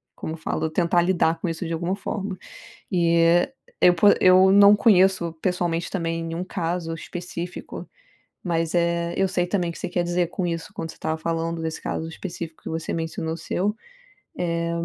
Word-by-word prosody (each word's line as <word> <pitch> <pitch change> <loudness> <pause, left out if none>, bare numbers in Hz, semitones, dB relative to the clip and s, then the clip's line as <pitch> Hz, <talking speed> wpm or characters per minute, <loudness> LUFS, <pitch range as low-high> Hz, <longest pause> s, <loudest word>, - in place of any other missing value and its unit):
como 160 - -5
eu - - -7
falo? 160 0 -2
Tentar 170 +2 +2
lidar 170 -2 +1
com 180 - -1
isso 165 +2 -4
de 165 - -3
alguma 170 +3 -1
forma, 200 -1 -4 0.5
eh, 170 +5 +3 0.3
eu 180 - +6
po 175 +4 +4
eu 185 +1 +6
não 200 +1 +8
conheço 190 -5 +4
pessoalmente 175 -1 -1
também 165 -3 -2
nenhum 165 +2 -4
caso 170 -2 -3
específico, 175 +1 -7 0.6
mas, 165 -2 -1
eh, 170 0 +1
eu 195 - +3
sei 180 -1 0
também 180 -2 -1
que 170 - -9
você - - -4
quer 175 0 0
dizer 175 0 0
com 180 +1 -3
isso 165 -1 -4
quando 165 - -5
você - - -14
estava 160 0 -2
falando 165 0 -2
desse 160 0 -4
caso 160 - -3
específico 165 -1 -7
que - - -6
você 160 0 -3
mencionou 160 0 -3
o - - -6
seu, 190 +5 -2 0.6
eh, 170 -1 -1
170 Hz, 180 wpm, -24 LUFS, 165-180 Hz, 0.6 s, não